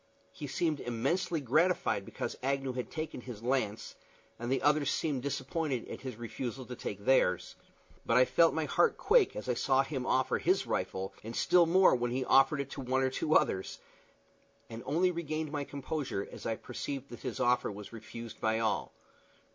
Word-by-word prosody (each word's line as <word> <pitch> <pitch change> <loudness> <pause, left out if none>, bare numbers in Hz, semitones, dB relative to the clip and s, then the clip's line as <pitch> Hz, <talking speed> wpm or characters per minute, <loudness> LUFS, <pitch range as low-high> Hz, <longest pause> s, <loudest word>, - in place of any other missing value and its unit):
He 145 - -7
seemed 155 +1 0
immensely 140 +9 -1
gratified 135 - +2
because - - -4
Agnew 135 0 -1
had 125 -1 -4
taken 155 -4 -5
his 120 -3 -9
lance, 120 -4 -1 0.5
and 120 +2 -3
the 135 - +1
others 145 -1 +3
seemed 145 -5 -1
disappointed 140 0 -2
at - - -7
his 130 -3 -6
refusal 120 +2 -5
to 125 - -7
take 100 -3 -6
theirs. 90 -9 +2 0.5
But 115 - +2
I 130 - +7
felt 160 +7 +4
my 160 -1 0
heart 465 - +2
quake 445 -4 +4
as - - -6
I 125 - +2
saw 135 +2 +2
him 135 -3 -4
offer 130 0 +2
his - - +2
rifle, 95 +1 -2
and 115 +2 -6
still 175 -2 +4
more 185 +3 +6
when 120 -1 0
he 130 +2 -1
offered 135 +2 +5
it 140 0 -7
to 140 - -5
one 130 +1 +1
or 130 - +1
two 155 +4 0
others, 95 - +2 0.9
and 115 +1 -6
only 175 +6 +2
regained 155 -3 -3
my 145 -2 -2
composure 140 -7 -4
as - - -7
I 115 - 0
perceived 140 +4 -6
that 120 - -9
his 125 -5 -5
offer 125 -2 +2
was 105 +2 -9
refused 115 0 -9
by 110 0 +2
all. 110 -2 -1
130 Hz, 185 wpm, -32 LUFS, 120-150 Hz, 0.9 s, I